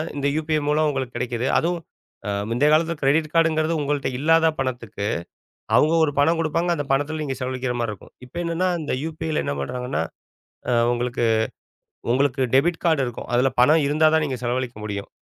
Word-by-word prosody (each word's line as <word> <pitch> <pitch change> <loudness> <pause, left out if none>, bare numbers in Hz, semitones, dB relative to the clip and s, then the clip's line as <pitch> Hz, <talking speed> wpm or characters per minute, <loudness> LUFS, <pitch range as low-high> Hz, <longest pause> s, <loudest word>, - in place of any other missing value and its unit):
இந்த 140 -1 -1
UPI 155 -1 0
மூலம் 155 +1 +2
உங்களுக்குக் 130 -4 -3
கிடைக்குது. 120 0 -2
அதுவும், 170 0 0 0.5
அ - - -1 0.2
முந்தைய 125 +6 +2
காலத்துல 165 +2 +2
கிரெடிட் 150 +3 +2
கார்டுன்றது 165 -1 +2
உங்கள்ட்ட 145 -1 -1
இல்லாத 165 +2 +4
பணத்துக்கு. 120 -6 -3 0.7
அவங்க 155 +2 +4
ஒரு 145 - -1
பணம் 165 +3 +3
கொடுப்பாங்க, 165 +2 0
அந்தப் 145 -3 -5
பணத்துல 145 +3 0
நீங்கச் 135 -2 -4
செலவழிக்கிற 130 -1 -2
மாரி 115 -2 -1
இருக்கும். 105 - -13
இப்ப 125 - -17
என்னன்னா 170 +2 0
இந்த 150 - -3 0.2
UPIல 160 -1 -2
என்ன - - -2
பண்றாங்கன்னா, 125 - -3 0.7
அ - - +3 0.2
உங்களுக்கு 120 0 -1 0.9
உங்களுக்கு 135 +1 +1
டெபிட் 165 +5 +2
கார்டு 160 -4 +3
இருக்கும். 120 -1 -7
அதுல 125 +2 +3
பணம் 155 +5 +5
இருந்தா 155 +2 +3
தான் 160 -1 +3
நீங்கச் 130 -4 -4
செலவழிக்க 125 0 -2
முடியும், 100 -1 -4
145 Hz, 170 wpm, -23 LUFS, 125-160 Hz, 0.9 s, பணம்